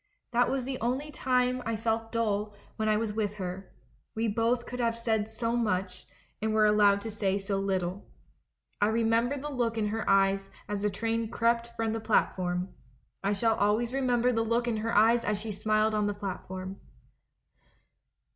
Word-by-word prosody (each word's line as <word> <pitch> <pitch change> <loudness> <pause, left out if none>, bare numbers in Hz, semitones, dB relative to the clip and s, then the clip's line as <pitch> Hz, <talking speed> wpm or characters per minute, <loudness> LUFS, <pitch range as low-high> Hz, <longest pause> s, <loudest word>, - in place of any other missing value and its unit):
That 245 0 +3
was 265 -2 -1
the 260 -1 -4
only 260 +6 -1
time 255 -2 +1
I 230 0 -1
felt 225 0 -1
dull 210 -2 -1 0.2
when 215 0 0
I 215 - +3
was 220 -1 -2
with 210 -1 -1
her 190 -1 -5 0.2
— - - -39
we 225 +1 0
both 230 +3 +1
could 250 - -6
have 230 -1 +1
said 220 -2 0
so 230 +1 -2
much 190 -5 -1 0.3
and 220 0 0
were 215 -1 +5
allowed 205 -1 +4
to 225 - -5
say 200 -2 0
so 195 0 -2
little. 190 -1 -2 0.7
I 205 - +5
remember 230 +4 +2
the 295 +2 -5
look 235 -4 -1
in 210 -1 0
her 220 0 -2
eyes 195 0 +3 0.2
as 205 0 -3
the 210 - +1
train 225 +2 -2
crept 235 +1 0
from 225 -1 -1
the 225 - -2
platform. 185 -4 0 0.5
I 200 +1 +2
shall 225 +2 +2
always 220 +4 +1
remember 250 -2 +2
the 225 -2 +1
look 230 +2 0
in 230 -2 0
her 225 +2 -2
eyes 230 +3 +5
as 210 -1 0
she 220 +1 -4
smiled 215 +1 +1
on 210 -1 +1
the 205 - -2
platform 190 -1 -6
220 Hz, 185 wpm, -29 LUFS, 205-235 Hz, 0.7 s, were